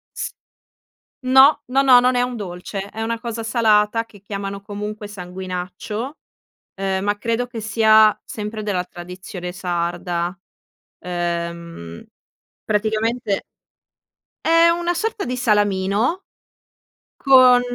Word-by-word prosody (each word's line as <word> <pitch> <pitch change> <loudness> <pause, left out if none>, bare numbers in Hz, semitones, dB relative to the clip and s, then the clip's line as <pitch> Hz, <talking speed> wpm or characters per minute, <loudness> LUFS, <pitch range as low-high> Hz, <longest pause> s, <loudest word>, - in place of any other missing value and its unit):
s - - -4 0.9
no, 265 +3 +6
no, 265 +2 +2
no, 260 -2 +7
non 250 +1 +2
è 245 - +3
un 250 -1 -2
dolce, 185 0 -6
è 220 - -7
una 230 +1 -2
cosa 230 -1 -5
salata 225 -1 +2
che 205 -3 -18
chiamano 200 0 -5
comunque 210 +1 -6
sanguinaccio, 185 - -6 0.6
ehm, 195 -1 -1
ma 205 0 0
credo 230 +3 -1
che 240 -2 -7
sia 215 0 +5
sempre 215 0 -6
della 190 -4 -1
tradizione 180 0 -8
sarda, 175 0 -2 0.6
ehm, 170 - -4 0.6
praticamente 215 0 -1 1.0
è 330 +1 +5
una 345 +1 0
sorta 435 +2 -2
di 250 +1 -3
salamino 210 - +1 0.9
con 255 -2 +6
210 Hz, 110 wpm, -21 LUFS, 185-245 Hz, 1.0 s, no